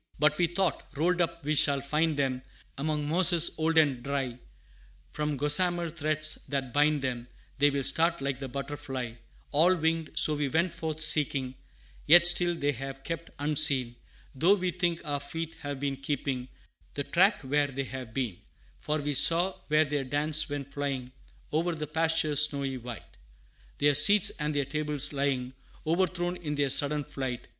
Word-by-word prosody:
But 150 +1 +2
we 175 - +3
thought, 175 -2 -2
rolled 175 +4 +1
up 170 -2 -3
we 150 - 0
shall 145 -2 +3
find 150 +3 -1
them 130 -2 -1 0.3
Among 150 +1 -3
mosses 170 +1 +5
old 160 +1 0
and 140 -6 +3
dry; 135 -2 -4 0.7
From 150 -1 -3
gossamer 170 +4 +3
threads 155 -1 -1
that 135 -3 -3
bind 150 -1 +2
them, 125 -2 -4 0.3
They 145 0 +5
will 140 -1 -2
start 165 +5 +2
like 135 -1 -3
the 135 - -6
butterfly, 135 -3 -6 0.4
All 170 +5 +4
winged: 160 -1 -1
so 155 - +2
we 145 -1 -1
went 165 +5 0
forth 160 -2 -5
seeking, 145 -4 +2 0.5
Yet 170 +3 +7
still 175 0 +5
they 145 -3 -1
have 135 +1 -8
kept 165 +1 -6
unseen; 145 -4 +2 0.4
Though 170 +9 +3
we 185 -2 -2
think 175 -1 -2
our 145 -1 -2
feet 165 +3 -6
have 145 -2 -6
been 140 -1 -3
keeping 135 -2 -4 0.5
The 140 - -2
track 190 +8 +2
where 145 +2 +1
they 135 0 -4
have 130 -1 -8
been, 115 -7 -4 0.4
For 150 +1 -2
we 145 -1 -3
saw 170 +7 +5
where 155 +1 +3
their 145 -1 -2
dance 150 +3 -1
went 140 -1 -6
flying 135 -3 -4 0.4
O'er 165 +2 0
the 155 -1 -5
pastures, 155 -1 +2
snowy 135 -2 -4
white." 120 -1 -9 0.7
Their 145 0 +3
seats 200 +8 +6
and 150 0 -2
their 140 -1 0
tables 150 0 -2
lying, 135 -2 -2 0.3
O'erthrown 175 +1 -1
in 150 -4 -5
their 140 -2 0
sudden 145 +2 +1
flight. 135 -4 -6
150 Hz, 165 wpm, -28 LUFS, 135-160 Hz, 0.7 s, Yet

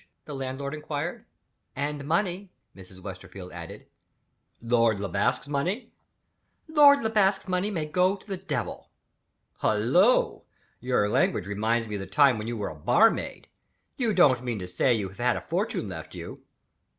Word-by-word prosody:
the 150 - -7
landlord 135 +1 -4
inquired. 150 +2 -4 0.5
"And 145 +1 -3
money," 185 +3 0 0.3
Mrs. 95 -1 -14
Westerfield 95 -1 -9
added. 85 -1 -9 0.7
"Lord 115 -3 +2
Le 100 - -2
Basque's 95 - 0
money." 160 - -2 0.8
"Lord 290 -3 +6
Le 220 - +1
Basque's 195 -2 +2
money 185 +2 0
may 165 -7 -2
go 180 +5 +2
to 195 - -17
the 195 - -3
Devil!" 155 - -5 0.7
"Hullo! 130 - +3 0.4
Your 125 -5 +1
language 105 -2 +1
reminds 110 +3 0
me 105 -1 -4
of - - -6
the 95 - -7
time 140 -6 +4
when 110 - -5
you 120 0 -3
were 105 - -3
a 80 - -9
barmaid. 120 - +2 0.5
You 245 -6 0
don't 140 - +4
mean 120 -3 -2
to 90 -2 -6
say 105 +8 +1
you 105 -5 0
have 95 - -17
had 125 0 +2
a - - -5
fortune - - -2
left - - -8
you?" - - -9
135 Hz, 160 wpm, -27 LUFS, -, 0.8 s, Lord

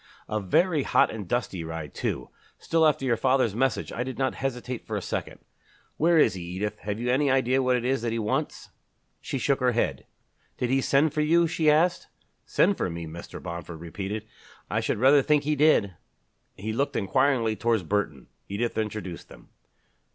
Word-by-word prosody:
"A 110 - -1
very 150 - +2
hot - - +3
and 105 -4 -6
dusty 100 -7 -2
ride 80 -3 -6
too. - - -3 0.3
Still, 165 -1 +2
after 140 -3 +1
your 120 -3 +2
father's 130 -4 +2
message 130 +3 0
I 115 - -3
did 130 0 -6
not 135 -1 0
hesitate 125 -2 -4
for - - -3
a - - 0
second. - - -5 0.6
Where 170 +2 +4
is 115 -8 +5
he, 95 - -6
Edith? 95 +5 -4
Have 105 +1 -4
you 125 +1 0
any 140 +2 +2
idea 130 0 +2
what 130 -1 +2
it 120 -1 -2
is 130 -1 +1
that 115 -1 -1
he 115 - -1
wants?" 105 -1 -2 0.5
She - - -4
shook 135 +2 +1
her 125 -1 +2
head. 115 - -1 0.5
"Did 125 0 -1
he 135 0 +3
send 140 +3 +2
for 155 - 0
you?" 170 +3 +4
she 160 -1 +1
asked. 165 +4 +2 0.4
"Send 200 - +3
for - - -1
me!" 85 0 -5
Mr. 80 +2 -8
Bomford 85 -1 -7
repeated. 100 +6 -5 0.5
"I - - +1
should - - -1
rather 135 +5 +6
think 150 +1 +2
he 150 +1 0
did." 145 -10 +3 0.6
He 110 +3 -4
looked 140 +5 -1
inquiringly 115 +2 +2
towards 115 -3 +1
Burton. 80 -7 -2 0.2
Edith 110 +4 -2
introduced 105 -5 -5
them. - - -15
120 Hz, 190 wpm, -26 LUFS, 100-135 Hz, 0.6 s, rather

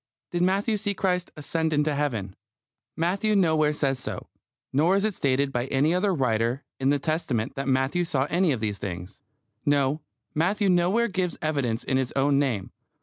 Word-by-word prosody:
Did 175 - -1
Matthew 200 +4 +2
see 205 -1 -2
Christ 180 -2 0
ascend 160 +2 -1
into 150 0 +2
Heaven? 115 -10 -2 0.6
Matthew 195 +6 +1
nowhere 160 -5 +3
says 135 -3 0
so. - - -5 0.4
Nor 160 +8 +3
is 200 +1 +2
it 215 - 0
stated 140 -2 +1
by 125 0 -1
any 140 +5 +2
other 190 +3 +2
writer 125 -4 0 0.2
in 135 0 +2
the 145 - +3
Testament 140 -6 -1
that 135 0 -4
Matthew 135 +6 +1
saw 135 -5 0
any 175 -1 +3
of 125 -5 -1
these 105 -2 -2
things. 90 0 -6 0.4
No: 145 +1 +2 0.3
Matthew 195 +6 +1
nowhere 185 +7 +3
gives 185 -3 -2
evidence 140 -7 -1
in 130 - 0
his 130 -2 -1
own 140 +1 +3
name. 120 -9 -1
150 Hz, 175 wpm, -26 LUFS, 130-180 Hz, 0.6 s, nowhere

